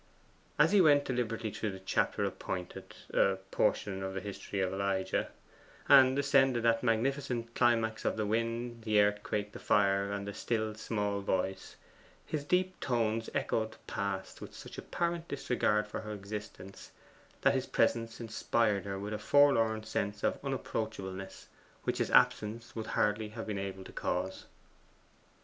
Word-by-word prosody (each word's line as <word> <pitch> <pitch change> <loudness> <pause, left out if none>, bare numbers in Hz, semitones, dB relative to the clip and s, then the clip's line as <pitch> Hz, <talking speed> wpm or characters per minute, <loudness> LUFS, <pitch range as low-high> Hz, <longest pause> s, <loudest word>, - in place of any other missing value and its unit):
As - - +5
he 205 -2 +6
went 145 -4 +5
deliberately 115 -3 -2
through 105 0 -3
the 95 - -8
chapter 95 - 0
appointed 90 -1 -5 0.2
a 95 - +4 0.2
portion 95 -2 +1
of 95 0 -4
the - - -1
history 100 0 -5
of 95 0 0
Elijah 95 -1 -1 0.6
and 135 -1 +7
ascended 135 -4 +3
that 115 -1 +3
magnificent 120 0 0
climax 115 -3 +2
of - - 0
the 110 - 0
wind, 115 +2 -2
the 110 -2 +3
earthquake, 105 0 +1
the - - -9
fire, 100 0 +2
and 100 0 -4
the 100 - -4
still 110 0 -1
small 105 -2 -2
voice, 95 0 -2 0.5
his 150 -2 -3
deep 185 +4 0
tones 115 -2 0
echoed 110 0 -1
past 100 -2 -4
with - - -9
such - - -9
apparent 170 -1 -2
disregard 105 -6 +1
of 105 - -18
her 110 -1 -5
existence, 100 -1 -8 0.5
that - - +4
his - - -1
presence 115 -1 +1
inspired 110 -2 0
her 100 -1 -3
with 100 +2 -4
a 105 - -3
forlorn 115 -4 +4
sense 105 -1 -3
of - - 0
unapproachableness, 105 -8 -4 0.4
which - - -1
his - - 0
absence 115 +2 +2
would 110 -1 -4
hardly 105 -1 0
have 115 +1 -6
been 105 -2 -3
able 95 -1 -5
to - - -11
cause. 95 +2 -2
110 Hz, 155 wpm, -32 LUFS, 100-120 Hz, 0.6 s, and